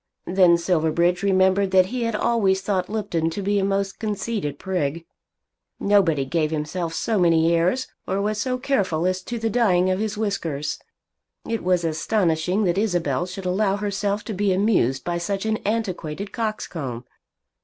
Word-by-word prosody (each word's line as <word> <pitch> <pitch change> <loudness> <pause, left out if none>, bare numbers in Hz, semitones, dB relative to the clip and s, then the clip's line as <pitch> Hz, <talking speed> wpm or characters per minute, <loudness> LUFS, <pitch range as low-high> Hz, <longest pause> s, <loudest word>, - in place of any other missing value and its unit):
Then 180 -2 +5
Silverbridge 170 +1 +1
remembered 190 0 +3
that 190 -1 +5
he 240 +4 -3
had 230 -1 -1
always 205 -4 +2
thought 185 -2 -1
Lupton 175 -7 -1
to 185 +5 -4
be 205 +1 +1
a - - 0
most 195 0 -1
conceited 210 -8 -3
prig. 165 -3 -2 0.7
Nobody 180 -9 +3
gave 155 +3 0
himself 160 +2 -3
so 220 -3 0
many 165 -1 +4
airs, 180 +10 +1 0.2
or 190 +1 0
was 210 +1 -1
so 255 +3 -1
careful 200 - 0
as 185 0 0
to 240 +5 -5
the 225 0 -1
dyeing 185 -6 +3
of 185 - 0
his 215 0 -2
whiskers. 165 -9 -2 0.7
It 230 -1 -2
was 180 -1 +2
astonishing 170 +3 +1
that 180 0 +1
Isabel 175 -8 0
should 185 +1 -7
allow 195 +2 +1
herself 205 0 -2
to 220 - -5
be 200 0 +1
amused 185 - +2
by 175 0 -2
such 195 +3 -2
an 220 0 +1
antiquated 200 -4 -3
coxcomb. 160 - -4
190 Hz, 165 wpm, -23 LUFS, 170-210 Hz, 0.7 s, Then